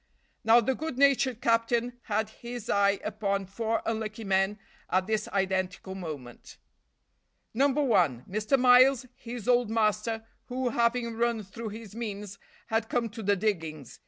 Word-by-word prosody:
Now 225 +2 +7
the 265 +4 +1
good 310 -1 -5
natured 270 -3 +3
captain 235 +1 +1
had 215 0 -1
his 235 0 -6
eye 200 0 +3
upon 200 -2 -1
four 225 +4 -2
unlucky 220 0 -3
men 195 +1 +1 0.3
at 185 +1 +2
this 215 +1 -1
identical 190 -1 -1
moment. 150 -10 -8 1.0
No. 270 +5 +4
1, 205 - +2
Mr. 215 +7 +1
Miles, 255 +1 +6
his 235 -2 -8
old 245 -2 +3
master, 220 0 0 0.2
who, 255 0 -2
having 235 0 0
run 235 -1 0
through 220 +4 -7
his 215 -1 -9
means, 210 -3 -6 0.3
had 225 0 -1
come 235 -2 0
to 225 +2 -8
the 205 0 +2
diggings. 165 - -3
220 Hz, 145 wpm, -28 LUFS, 200-240 Hz, 1.0 s, Now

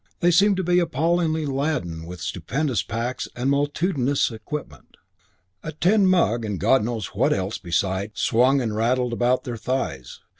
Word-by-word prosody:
They 175 0 +3
seemed 200 +3 +4
to 190 - -1
be 180 +1 +3
appallingly 165 0 0
laden 135 - -2
with 90 -1 -8
stupendous 130 - -2
packs 115 +4 -4
and 130 +3 0
multitudinous 145 -2 0
equipment. 145 +6 -8 0.6
A 155 - -6
tin 190 +6 +3
mug 165 -11 +2
and 105 -4 -3
God 120 +4 +3
knows 110 -3 -4
what - - +2
else 95 +2 -1
beside 95 +3 -1
swung 130 +4 +3
and 110 -3 -2
rattled 120 +2 +1
about 125 +2 +1
their 120 -2 -5
thighs. 110 - -3
130 Hz, 155 wpm, -23 LUFS, 110-155 Hz, 0.6 s, seemed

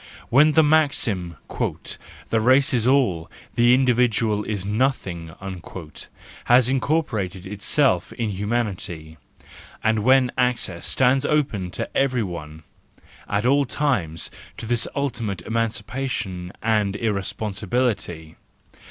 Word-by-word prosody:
When 150 +5 +5
the 160 - +6
maxim, 125 - +1 0.2
u - - -1 0.5
The 115 - +3
race 135 +6 +4
is 120 -1 +2
all, 120 -12 +2 0.2
the 120 +1 +5
individual 120 -4 +2
is 100 -3 -3
nothing,"—has 95 - -2
incorporated 115 - -1
itself 100 - +1
in 115 -3 -2
humanity, 95 -6 -3 0.7
and 110 0 +2
when 130 +2 +4
access 125 -8 0
stands 130 +1 +3
open 135 -12 0
to - - -2
every 130 -4 +2
one 80 -4 -7 0.7
at 105 +2 0
all 140 +2 +4
times 110 - -1 0.3
to - - -6
this 120 0 +2
ultimate 115 -10 -2
emancipa¬ 115 +4 -2
tion 90 -7 -4
and 105 -3 +1
irresponsibility. 100 -4 -2
110 Hz, 110 wpm, -23 LUFS, 95-130 Hz, 0.7 s, the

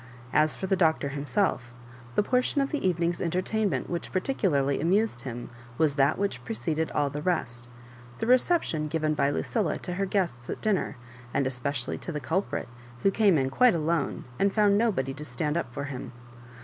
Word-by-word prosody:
As 155 +1 +3
for - - -4
the 195 - +2
Doctor 160 -5 +2
himself, 140 - -1 0.4
the - - +4
portion 250 +5 +1
of 275 0 0
the 295 - -2
evening's 170 -1 0
entertain 185 +5 0
ment 135 -6 -2
which 170 -1 -4
particularly 170 - +1
amused 180 - +1
Mm 120 -2 -5 0.3
was 155 -3 +3
that 140 +1 +3
which 190 -12 -2
preceded 150 +8 -2
all 145 -1 0
the 150 - -4
rest 125 -9 -2 0.3
— 120 0 -19
^the - - -1
reception 250 - +2
given 155 0 0
by 140 -2 +2
Lucilla 200 +6 0
to 180 - -5
her 195 +2 -1
guests 170 -12 -1
at - - -3
dinner, 210 -10 0 0.4
and 140 - +2
especially 130 0 -2
to - - -5
the 150 - -3
culprit, 165 +8 -2 0.4
who 195 - +5
came 200 -5 +4
in 135 -1 0
quite 245 - +5
alone, 160 -2 -1
and 200 0 +2
found 205 -2 +5
nobody 200 - +1
to 145 +2 -8
stand 150 +2 -2
up 170 -8 -2
for 140 - -4
him. 135 -2 -6
160 Hz, 190 wpm, -28 LUFS, 140-195 Hz, 0.4 s, who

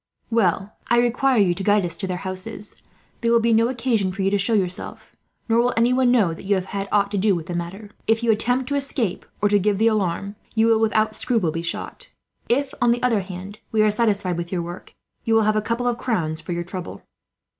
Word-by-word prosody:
"Well, 200 -2 +1
I 240 - +3
require 245 +2 +2
you 195 -4 +4
to 195 - -6
guide 205 -1 +3
us 170 -1 -3
to 190 - -3
their 180 -1 -2
houses. 190 +3 -5 0.5
There 230 -1 +1
will 235 - +5
be 230 0 +2
no 225 +1 +4
occasion 230 -6 0
for 195 +1 -3
you 195 - +2
to 205 - +3
show 200 +4 +1
yourself, 185 -3 -3 0.3
nor 230 0 +3
will 245 +1 0
anyone 250 +2 +3
know 215 -9 +3
that 165 - -11
you 200 +1 +2
have 185 -1 -2
had 195 0 -3
aught 200 -1 +2
to 205 - 0
do 200 0 +3
with 165 -2 -4
the 175 - -5
matter. 185 +5 -5 0.2
If 225 +1 +2
you 230 - +4
attempt 245 +4 +1
to 285 - 0
escape, 265 -8 -1 0.2
or 205 - +4
to 205 0 +4
give 200 +1 +1
the 220 - +2
alarm, 200 -2 0 0.2
you 220 0 +4
will 225 -1 +4
without 220 0 +1
scruple 220 -10 0
be 165 +1 -3
shot. - - -6 0.4
If, 270 +3 +1
on 240 - +4
the 240 +1 +1
other 230 -5 +2
hand, 190 +2 -8
we 215 -1 +3
are 215 - +4
satisfied 205 -5 0
with 170 0 -5
your 175 -3 -1
work, 175 +2 -9 0.3
you 225 - +2
will 225 - +4
have 215 0 +2
a 215 - +2
couple 230 +3 -2
of 240 -1 0
crowns 160 -10 -1
for - - -7
your 175 0 -2
trouble." 180 0 -7
210 Hz, 240 wpm, -22 LUFS, 185-230 Hz, 0.5 s, will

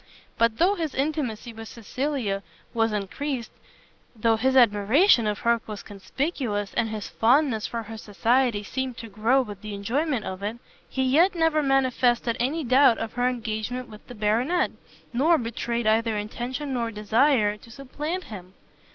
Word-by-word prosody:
But 230 -1 +2
though 365 +7 +4
his 325 -7 -3
intimacy 265 -5 -2
with 225 0 -9
Cecilia 235 -3 -3 0.3
was 225 -1 +1
encreased, 230 +5 -3 0.6
though 225 0 +2
his 260 +4 +1
admiration 230 - +5
of 210 -1 -1
her 235 -1 +2
was 210 -2 -7
conspicuous, 205 - -3
and 225 - 0
his 215 -2 -5
fondness 245 -1 +2
for 230 -1 -4
her 220 +1 -8
society 225 +1 +1
seemed 260 +3 -4
to 230 - -8
grow 225 +6 +2
with 205 -4 -9
the 215 -1 -6
enjoyment 250 +5 -1
of 190 +1 -5
it, 210 +3 -3 0.3
he 265 - -1
yet 320 +9 +4
never 325 -2 +2
manifested 255 -4 +2
any 290 +7 0
doubt 255 -1 +5
of 225 -1 -5
her 245 0 +1
engagement 235 +1 -4
with 215 -1 -13
the 245 - -10
Baronet, 230 +12 +1 0.4
nor 310 +7 +4
betrayed 235 -1 -3
either 220 0 +2
intention 250 +6 -4
or 235 -2 -1
desire 215 +1 +2
to 230 - -17
supplant 295 +8 -5
him. 185 - -10
235 Hz, 160 wpm, -25 LUFS, 215-270 Hz, 0.6 s, admiration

